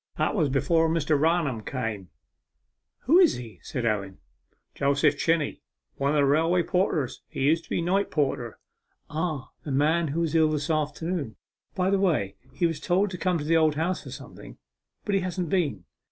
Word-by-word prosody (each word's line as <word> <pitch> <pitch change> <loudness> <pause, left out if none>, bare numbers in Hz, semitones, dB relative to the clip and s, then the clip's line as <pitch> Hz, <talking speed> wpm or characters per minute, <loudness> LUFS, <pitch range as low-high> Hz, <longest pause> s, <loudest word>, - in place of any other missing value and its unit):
That - - +1
was 160 -9 +1
before 160 +4 +2
Mr. 160 -2 +1
Raunham 150 -5 +1
came.' 110 -8 -4 0.9
'Who 325 +8 +5
is 360 -4 +5
he?' 115 -7 -9
said 120 - -4
Owen. 100 -4 -1 0.6
'Joseph 140 0 +2
Chinney, 165 -3 0 0.4
one 140 0 0
of 150 - +1
the 145 -1 +4
railway 165 +5 +3
porters; 165 -8 0
he - - -6
used 160 +4 +2
to - - -24
be 170 - -1
night 195 +3 +1
porter.' 135 -6 -1 0.5
'Ah 155 -3 -3
the - - -7
man 155 +5 +2
who 155 +4 -1
was 165 -2 -1
ill 160 -1 +4
this 150 +1 -1
afternoon; 155 - -2 0.4
by 185 0 +1
the 200 - +2
way, 145 - +1 0.2
he 175 - 0
was 165 -2 -1
told 185 +2 +1
to 180 - -5
come 180 -1 +1
to 150 - -4
the 165 +2 +3
Old 155 -2 +3
House 170 +4 -1
for - - -10
something, - - -11 0.5
but 205 - -1
he 195 - +2
hasn't 180 -2 -3
been. 145 - 0
155 Hz, 185 wpm, -26 LUFS, 140-175 Hz, 0.9 s, Who